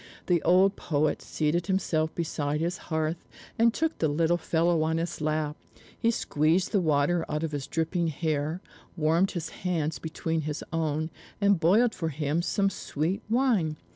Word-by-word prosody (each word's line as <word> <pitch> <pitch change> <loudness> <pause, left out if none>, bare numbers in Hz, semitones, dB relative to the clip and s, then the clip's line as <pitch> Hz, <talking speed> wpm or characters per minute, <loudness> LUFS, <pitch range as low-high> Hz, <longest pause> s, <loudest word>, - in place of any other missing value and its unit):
The 175 -3 +2
old 190 +3 +4
poet 150 -1 0
seated 165 +3 -1
himself 165 -5 0
beside 150 -3 -1
his 170 +2 -2
hearth, 160 +1 -1 0.4
and 230 +1 +5
took 320 +6 -1
the 160 - +2
little 165 +3 +2
fellow 170 0 +1
on 160 +1 +1
his 165 -1 -3
lap; 155 -1 -1 0.4
he 230 - +1
squeezed 165 -4 +1
the 200 - +2
water 160 +2 +2
out 150 +1 -2
of 160 - -2
his 140 -2 -4
dripping 165 +1 0
hair, 155 +1 -1 0.4
warmed 165 +4 +3
his 170 -2 -3
hands 165 -4 -1
between 160 0 -2
his 150 0 -4
own, 155 0 -1 0.3
and 200 -3 +3
boiled 215 +9 +4
for 165 - -2
him 150 +2 -1
some 195 +2 +1
sweet 170 +2 -2
wine. 220 - +2
165 Hz, 165 wpm, -28 LUFS, 155-180 Hz, 0.4 s, and